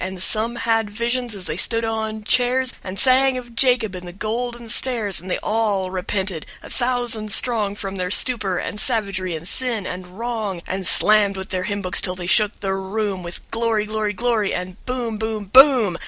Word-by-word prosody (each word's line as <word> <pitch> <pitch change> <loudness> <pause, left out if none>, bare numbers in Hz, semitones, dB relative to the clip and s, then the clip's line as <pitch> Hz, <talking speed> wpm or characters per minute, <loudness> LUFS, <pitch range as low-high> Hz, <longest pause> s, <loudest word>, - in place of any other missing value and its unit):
And 185 0 -5
some 220 +5 +1
had 225 -2 0
visions, 235 +1 -2
as 190 -2 -7
they 155 - -4
stood 230 +4 +1
on 220 -1 -3
chairs, 250 +2 +2
And 190 0 -7
sang 260 +1 +5
of 240 -2 -9
Jacob, 240 -5 +3
and 180 -1 -8
the - - -7
golden 235 +4 -4
stairs, 225 -6 -1
And 185 - -10
they - - 0
all 210 -4 0
repented, 190 -2 -3 0.2
a - - -10
thousand 240 -4 -1
strong 210 -3 +1
From 195 -2 -6
their 180 -1 -2
stupor 205 -3 +2
and 210 - -4
savagery 200 -7 0
and 160 +2 -7
sin 235 -3 0
and 180 +1 -7
wrong 220 -6 -4
And 190 -1 -3
slammed 205 -1 +5
with 190 +1 -6
their 185 -1 -2
hymn 205 -1 -3
books 180 -1 +1
till 180 - -2
they 180 -1 -6
shook 205 +3 +2
the 195 -1 -1
room 195 0 -3
With 175 0 -9
"glory, 225 -2 0
glory, 215 -1 -2
glory," 230 -2 0
And 180 +2 -6
"Boom, 245 -3 -3
boom, 220 -1 -3
BOOM." 255 - +6
215 Hz, 195 wpm, -21 LUFS, 190-235 Hz, 0.2 s, BOOM